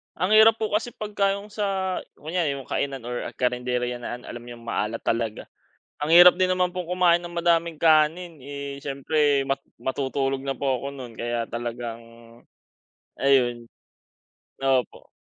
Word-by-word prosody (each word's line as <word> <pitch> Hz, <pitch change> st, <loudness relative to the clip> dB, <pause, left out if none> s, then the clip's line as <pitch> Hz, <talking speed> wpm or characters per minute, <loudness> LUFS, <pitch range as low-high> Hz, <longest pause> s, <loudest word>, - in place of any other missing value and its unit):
Ang 185 Hz, +5 st, -1 dB
hirap 220 Hz, +1 st, +7 dB
po 220 Hz, -2 st, -3 dB
kasi 220 Hz, +3 st, -1 dB
pag 215 Hz, -1 st, -6 dB
ka 200 Hz, 0 st, +3 dB
yong 205 Hz, +1 st, -9 dB
sa, 195 Hz, -3 st, -1 dB, 0.2 s
kunyari 160 Hz, -2 st, -2 dB
yung 135 Hz, -2 st, -9 dB
kainan 135 Hz, -3 st, -2 dB
or 120 Hz, 0 st, -4 dB
karenderya 125 Hz, -1 st, -1 dB
na, 120 Hz, -, -5 dB
an 120 Hz, -, -13 dB
alam 120 Hz, 0 st, -8 dB
yung 120 Hz, -1 st, -10 dB
maalat 115 Hz, -1 st, -2 dB
talaga. 115 Hz, -2 st, -1 dB, 0.6 s
Ang 155 Hz, +3 st, +3 dB
hirap 175 Hz, +1 st, +10 dB
din 185 Hz, 0 st, +2 dB
naman 180 Hz, -1 st, +1 dB
pong 180 Hz, -2 st, -4 dB
kumain 180 Hz, -1 st, +4 dB
ng 175 Hz, -, -7 dB
madaming 170 Hz, -2 st, +1 dB
kanin, 160 Hz, +1 st, +3 dB
eh, 140 Hz, 0 st, -6 dB
siyempre 140 Hz, 0 st, +1 dB
mat 135 Hz, 0 st, 0 dB, 0.2 s
matutulog 135 Hz, 0 st, -1 dB
na 135 Hz, 0 st, -2 dB
po 130 Hz, -1 st, -1 dB
ako -, -, -4 dB
nun 125 Hz, -4 st, -9 dB
kaya 120 Hz, 0 st, -2 dB
talagang, 120 Hz, 0 st, -5 dB, 1.2 s
ayun. 125 Hz, -4 st, +2 dB, 1.0 s
Opo. 130 Hz, -3 st, 0 dB
140 Hz, 160 wpm, -25 LUFS, 125-175 Hz, 1.2 s, hirap